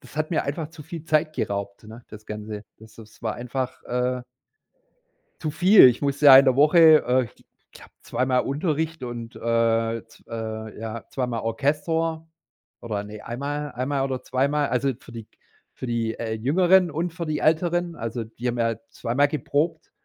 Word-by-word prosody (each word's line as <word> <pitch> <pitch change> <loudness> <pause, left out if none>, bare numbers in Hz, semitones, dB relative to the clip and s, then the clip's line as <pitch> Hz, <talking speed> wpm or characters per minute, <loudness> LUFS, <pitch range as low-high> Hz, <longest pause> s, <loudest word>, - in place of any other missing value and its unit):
das 130 - -16
hat 155 0 -1
mir 160 - +1
einfach 150 +2 -3
zu 160 -2 -11
viel 165 +1 -8
Zeit 155 0 +1
geraubt, 100 +1 -4
ne, 110 +3 -11
das 110 0 -12
Ganze. 105 0 -6
Das 110 0 -16
das 110 0 -15
war 110 -2 -2
einfach, 125 +1 -4
äh 125 +1 -1 1.2
zu 155 - -2
viel. 185 +3 +7
Ich 125 +2 -1
musste 140 +1 +1
ja 135 -2 +11
in 135 - +6
der 130 -1 +3
Woche, 155 +1 +6
äh, 125 +1 +3
ich - - -25 0.3
glaube - - -15
2 130 - -1
Mal 130 -1 +3
Unterricht 155 +1 -2
und 120 -2 -6
äh, 115 0 0
z 115 - -21
äh, 110 -1 -6
ja 115 +1 -6
2 130 -2 -2
Mal 115 -2 -3
Orchester 160 +7 -1 0.5
oder 105 -3 -3
ne, 105 0 -9
1 120 - -5
Mal 145 +1 -3
1 130 +2 -3
Mal 140 -2 0
oder 130 -1 -2
2 130 +1 0
Mal 150 0 0
Also, 130 +2 0
für 120 - -14
die 115 -1 -8
g - - -37 0.4
für - - -7
die, 115 -2 -1
äh, 110 -1 -3
Jüngeren 175 +9 +3
und 165 +3 -2
für 170 -1 -4
die 155 -1 -1
Älteren 170 +2 +1
also, 115 0 -4
die 115 +2 -8
haben 120 0 -2
ja 115 -1 +1
2 115 0 -4
Mal 145 +3 +5
geprobt 155 +3 -2
130 Hz, 200 wpm, -24 LUFS, 115-155 Hz, 1.2 s, ja